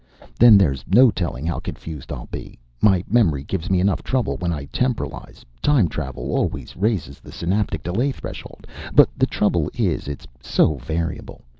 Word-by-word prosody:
Then 115 Hz, -3 st, +9 dB
there's 70 Hz, -10 st, +2 dB
no 120 Hz, +6 st, +6 dB
telling 80 Hz, -8 st, -3 dB
how 85 Hz, -, -1 dB
confused 80 Hz, -4 st, -8 dB
I'll -, -, -6 dB
be. -, -, -8 dB, 0.2 s
My 95 Hz, -4 st, +4 dB
memory 95 Hz, -, +2 dB
gives 95 Hz, +3 st, -4 dB
me 95 Hz, -1 st, +3 dB
enough 95 Hz, 0 st, +1 dB
trouble 130 Hz, -4 st, -1 dB
when 85 Hz, -1 st, -2 dB
I 75 Hz, -4 st, -4 dB
temporalize. 125 Hz, -2 st, -3 dB, 0.2 s
Time 135 Hz, -11 st, +3 dB
travel 65 Hz, -5 st, -5 dB
always 65 Hz, -3 st, -2 dB
raises 95 Hz, -8 st, -1 dB
the -, -, -13 dB
synaptic 90 Hz, -3 st, -1 dB
delay 120 Hz, +11 st, 0 dB
threshold, -, -, -9 dB, 0.3 s
but -, -, +7 dB
the -, -, +2 dB
trouble -, -, 0 dB
is -, -, -1 dB
it's 70 Hz, -1 st, -6 dB, 0.2 s
so 75 Hz, +2 st, +2 dB
variable. 80 Hz, +3 st, -4 dB
90 Hz, 165 wpm, -22 LUFS, 75-105 Hz, 0.3 s, Then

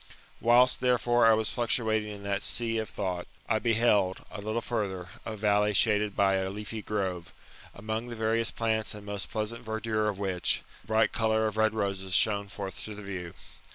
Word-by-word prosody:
Whilst, 125 Hz, +2 st, +5 dB
therefore, 120 Hz, -1 st, +3 dB
I 110 Hz, -, +7 dB
was 110 Hz, 0 st, 0 dB
fluctuating 110 Hz, -3 st, +1 dB
in 100 Hz, -1 st, -9 dB
that 100 Hz, 0 st, -1 dB
sea 115 Hz, -1 st, +1 dB
of 110 Hz, -, -4 dB
thought, 90 Hz, -3 st, -3 dB, 0.2 s
I 110 Hz, -1 st, +2 dB
beheld, 110 Hz, -5 st, +2 dB
a 105 Hz, -, -7 dB
little 110 Hz, +3 st, -1 dB
further, 100 Hz, -7 st, -3 dB, 0.2 s
a 110 Hz, -, -4 dB
valley 105 Hz, 0 st, +2 dB
shaded 105 Hz, 0 st, +2 dB
by 95 Hz, -1 st, +3 dB
a 95 Hz, 0 st, -1 dB
leafy 105 Hz, +2 st, -6 dB
grove; 95 Hz, -6 st, -3 dB, 0.4 s
among 110 Hz, +3 st, -4 dB
the 120 Hz, -, -6 dB
various 115 Hz, +1 st, +1 dB
plants 110 Hz, -2 st, -1 dB
and 105 Hz, -1 st, -10 dB
most 100 Hz, -5 st, -4 dB
pleasant 115 Hz, +2 st, -3 dB
verdure 110 Hz, -1 st, -1 dB
of 100 Hz, -, -4 dB
which, 95 Hz, -3 st, 0 dB, 0.2 s
the -, -, -25 dB
bright 110 Hz, 0 st, +3 dB
colour 110 Hz, -1 st, +1 dB
of 110 Hz, -1 st, -1 dB
red 110 Hz, 0 st, +2 dB
roses 95 Hz, -3 st, -1 dB
shone 100 Hz, -2 st, +3 dB
forth 95 Hz, 0 st, -6 dB
to 110 Hz, -, -7 dB
the 105 Hz, -, -9 dB
view. 90 Hz, -4 st, -6 dB
105 Hz, 190 wpm, -29 LUFS, 100-110 Hz, 0.4 s, I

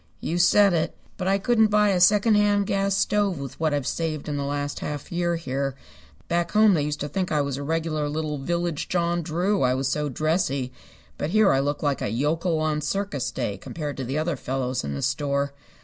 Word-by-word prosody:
"You 170 Hz, +2 st, -2 dB
said 195 Hz, +2 st, +5 dB
it. 160 Hz, -2 st, -1 dB, 0.2 s
But 185 Hz, -, -3 dB
I 195 Hz, +1 st, +3 dB
couldn't 220 Hz, +2 st, +3 dB
buy 210 Hz, 0 st, +3 dB
a 185 Hz, -2 st, +2 dB
secondhand 205 Hz, +1 st, +4 dB
gas 195 Hz, -1 st, 0 dB
stove 200 Hz, -3 st, +1 dB
with 135 Hz, -2 st, -7 dB
what 160 Hz, -1 st, +1 dB
I've 145 Hz, -2 st, -1 dB
saved 155 Hz, -1 st, -2 dB
in 150 Hz, -, -2 dB
the 140 Hz, -, -2 dB
last 145 Hz, 0 st, -3 dB
half 145 Hz, -2 st, -5 dB
year 175 Hz, 0 st, 0 dB
here. 140 Hz, -4 st, -3 dB, 0.5 s
Back 170 Hz, 0 st, -1 dB
home 215 Hz, -1 st, +6 dB
they 160 Hz, -, +2 dB
used 150 Hz, 0 st, -3 dB
to 145 Hz, -, -2 dB
think 185 Hz, +3 st, -2 dB
I 150 Hz, -2 st, +2 dB
was 140 Hz, -2 st, -2 dB
a -, -, -5 dB
regular 155 Hz, 0 st, -1 dB
little 150 Hz, -1 st, -3 dB
village 170 Hz, +2 st, -2 dB
John 175 Hz, -1 st, 0 dB
Drew, 175 Hz, +5 st, 0 dB
I 125 Hz, -1 st, +3 dB
was 135 Hz, 0 st, -1 dB
so 150 Hz, +2 st, -1 dB
dressy. 140 Hz, -3 st, 0 dB, 0.5 s
But 145 Hz, -, -1 dB
here 215 Hz, -1 st, +4 dB
I 135 Hz, -, +3 dB
look 145 Hz, +2 st, -1 dB
like 145 Hz, -2 st, 0 dB
a -, -, -1 dB
yokel 160 Hz, -, 0 dB
on 155 Hz, -1 st, 0 dB
circus 150 Hz, -7 st, -2 dB
day 120 Hz, -6 st, -3 dB
compared 150 Hz, -, -5 dB
to 135 Hz, -, -3 dB
the 130 Hz, +4 st, -3 dB
other 155 Hz, +1 st, 0 dB
fellows 130 Hz, -1 st, -2 dB
in 70 Hz, 0 st, -3 dB
the 70 Hz, -, -4 dB
store. 140 Hz, +1 st, 0 dB
155 Hz, 215 wpm, -25 LUFS, 140-180 Hz, 0.5 s, home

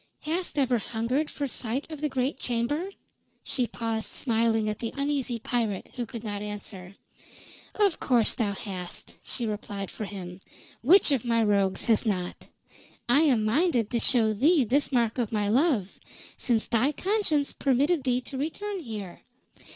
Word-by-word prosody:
"Hast 335 Hz, +1 st, -2 dB
ever 255 Hz, -4 st, +2 dB
hungered 240 Hz, +8 st, -1 dB
for 285 Hz, -, -3 dB
sight 255 Hz, 0 st, -3 dB
of 305 Hz, -2 st, -7 dB
the 300 Hz, -, 0 dB
great 260 Hz, +1 st, -1 dB
chamber?" 250 Hz, +10 st, -1 dB, 0.5 s
She 250 Hz, -3 st, 0 dB
paused 225 Hz, -1 st, -2 dB
smiling 225 Hz, -3 st, +1 dB
at 210 Hz, 0 st, -2 dB
the 230 Hz, -, -3 dB
uneasy 280 Hz, -4 st, -1 dB
pirate, 225 Hz, -4 st, -2 dB
who 240 Hz, -2 st, -3 dB
could 230 Hz, -3 st, -7 dB
not 205 Hz, -2 st, -4 dB
answer. 200 Hz, -2 st, -7 dB, 0.8 s
"Of 405 Hz, -5 st, +2 dB
course 240 Hz, -4 st, +3 dB
thou 210 Hz, -4 st, -1 dB
hast," 185 Hz, -3 st, -6 dB
she 240 Hz, -, 0 dB
replied 205 Hz, -2 st, -4 dB
for 215 Hz, -, -5 dB
him. 185 Hz, -3 st, -7 dB, 0.4 s
"Which 335 Hz, +5 st, +6 dB
of 270 Hz, -5 st, +2 dB
my 230 Hz, -2 st, +2 dB
rogues 200 Hz, -2 st, +2 dB
has 225 Hz, -3 st, +3 dB
not? 185 Hz, -6 st, -3 dB, 0.6 s
I 245 Hz, +4 st, +5 dB
am 260 Hz, -9 st, +3 dB
minded 245 Hz, -, +2 dB
to 235 Hz, -, +1 dB
show 225 Hz, -3 st, +3 dB
thee 290 Hz, -, +4 dB
this 275 Hz, +6 st, +1 dB
mark 235 Hz, -2 st, +1 dB
of 235 Hz, -4 st, -1 dB
my 210 Hz, -2 st, 0 dB
love, 240 Hz, -, +2 dB, 0.4 s
since 235 Hz, -4 st, 0 dB
thy 250 Hz, +6 st, +2 dB
conscience 365 Hz, -7 st, 0 dB
permitted 280 Hz, +4 st, +2 dB
thee 250 Hz, -1 st, +1 dB
to 265 Hz, +1 st, -7 dB
return 390 Hz, +7 st, -3 dB
here. 215 Hz, -, -7 dB
235 Hz, 160 wpm, -27 LUFS, 215-280 Hz, 0.8 s, Which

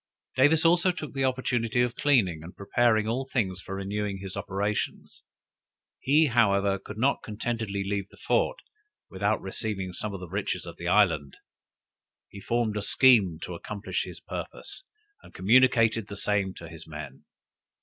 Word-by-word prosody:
Davis 145 Hz, +5 st, +4 dB
also 175 Hz, +2 st, +5 dB
took 155 Hz, -4 st, -7 dB
the 135 Hz, -1 st, -1 dB
opportunity 125 Hz, -2 st, 0 dB
of 120 Hz, -1 st, -2 dB
cleaning 105 Hz, -, +2 dB
and 85 Hz, +3 st, -11 dB
preparing 110 Hz, +1 st, +2 dB
all 120 Hz, +4 st, -1 dB
things 95 Hz, -7 st, -1 dB
for 95 Hz, -, -6 dB
renewing 100 Hz, +1 st, -3 dB
his 95 Hz, 0 st, -7 dB
operations. 100 Hz, +1 st, -3 dB, 0.8 s
He, 150 Hz, +4 st, +4 dB
however, 100 Hz, -6 st, +2 dB
could 105 Hz, -, -10 dB
not 135 Hz, +5 st, +2 dB
contentedly 110 Hz, -2 st, -3 dB
leave 100 Hz, 0 st, -3 dB
the -, -, -18 dB
fort, -, -, +1 dB, 0.5 s
without 100 Hz, +2 st, 0 dB
receiving 95 Hz, -1 st, -3 dB
some 105 Hz, +3 st, -4 dB
of 100 Hz, -, -6 dB
the 90 Hz, -, -8 dB
riches 90 Hz, -1 st, -3 dB
of 85 Hz, -1 st, -9 dB
the 85 Hz, -, -5 dB
island. 85 Hz, -8 st, +2 dB, 0.9 s
He 100 Hz, -, -10 dB
formed 115 Hz, 0 st, -1 dB
a -, -, -1 dB
scheme 105 Hz, -7 st, +4 dB
to 90 Hz, -, -5 dB
accomplish 100 Hz, +4 st, -4 dB
his -, -, -9 dB
purpose, -, -, -7 dB, 0.4 s
and -, -, -17 dB
communicated 115 Hz, 0 st, +4 dB
the 100 Hz, -, -7 dB
same 100 Hz, -2 st, 0 dB
to 85 Hz, -, -9 dB
his 80 Hz, 0 st, -11 dB
men. 75 Hz, -3 st, -9 dB
105 Hz, 160 wpm, -27 LUFS, 95-120 Hz, 0.9 s, also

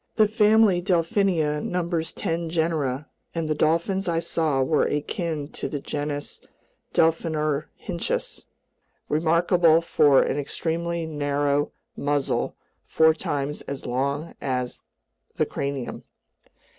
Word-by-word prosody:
The 215 Hz, -2 st, +5 dB
family 215 Hz, -3 st, +4 dB
Delphinia 170 Hz, -4 st, +1 dB
numbers 170 Hz, -2 st, -1 dB
ten 165 Hz, 0 st, -2 dB
genera, 155 Hz, -4 st, -1 dB, 0.3 s
and 165 Hz, -1 st, -1 dB
the 155 Hz, -, +1 dB
dolphins 170 Hz, +6 st, +1 dB
I 170 Hz, -1 st, +1 dB
saw 155 Hz, -5 st, +1 dB
were 150 Hz, +3 st, +2 dB
akin 150 Hz, 0 st, -2 dB
to -, -, -5 dB
the 145 Hz, -, -3 dB
genus 145 Hz, +1 st, -4 dB, 0.5 s
Delphinorhynchus, 155 Hz, -2 st, -1 dB, 0.7 s
remarkable 165 Hz, +1 st, +4 dB
for 145 Hz, -4 st, +4 dB
an 145 Hz, -, -1 dB
extremely 170 Hz, +3 st, -2 dB
narrow 145 Hz, -1 st, 0 dB, 0.2 s
muzzle 145 Hz, -1 st, -1 dB, 0.3 s
four 160 Hz, 0 st, +5 dB
times 145 Hz, -2 st, -3 dB
as 140 Hz, -1 st, -5 dB
long 140 Hz, +6 st, -2 dB
as 125 Hz, -2 st, -2 dB, 0.5 s
the -, -, +2 dB
cranium. 140 Hz, -3 st, -4 dB
160 Hz, 105 wpm, -25 LUFS, 145-170 Hz, 0.7 s, The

